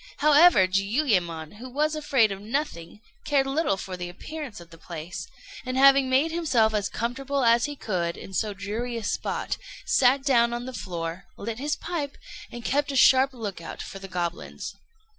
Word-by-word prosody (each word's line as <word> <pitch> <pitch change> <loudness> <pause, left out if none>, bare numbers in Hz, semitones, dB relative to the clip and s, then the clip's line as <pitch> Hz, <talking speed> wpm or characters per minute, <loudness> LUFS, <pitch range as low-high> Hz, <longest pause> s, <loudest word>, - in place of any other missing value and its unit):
However, 300 - +6
Jiuyémon, 195 - 0
who 255 +3 -8
was 300 +4 0
afraid 270 -8 +2
of 195 0 -5
nothing, 215 - -4 0.2
cared 280 -2 +2
little 270 -6 0
for 190 -1 -6
the 175 -1 -5
appearance 275 - -7
of 170 -1 -14
the 165 - -13
place, 170 0 -7 0.4
and 255 +1 -3
having 275 0 +6
made 275 +5 +3
himself 265 -10 +2
as 205 -2 0
comfortable 270 +4 -2
as 235 0 +4
he 290 0 -5
could 175 -9 -2
in 195 - -10
so 215 +2 0
dreary 220 +5 -4
a 230 - -5
spot, - - -2 0.3
sat 265 +1 +4
down 235 -4 +3
on 240 0 -4
the 260 - -6
floor, 170 -4 -5
lit 225 +3 -5
his 295 +2 -1
pipe, 290 -5 -4 0.3
and 240 -1 -8
kept 285 +1 +1
a - - -4
sharp 265 +1 +6
look 215 -8 -6
out 165 - -7
for 195 - -8
the 195 - -8
goblins. 175 -2 -4
235 Hz, 180 wpm, -26 LUFS, 190-275 Hz, 0.4 s, However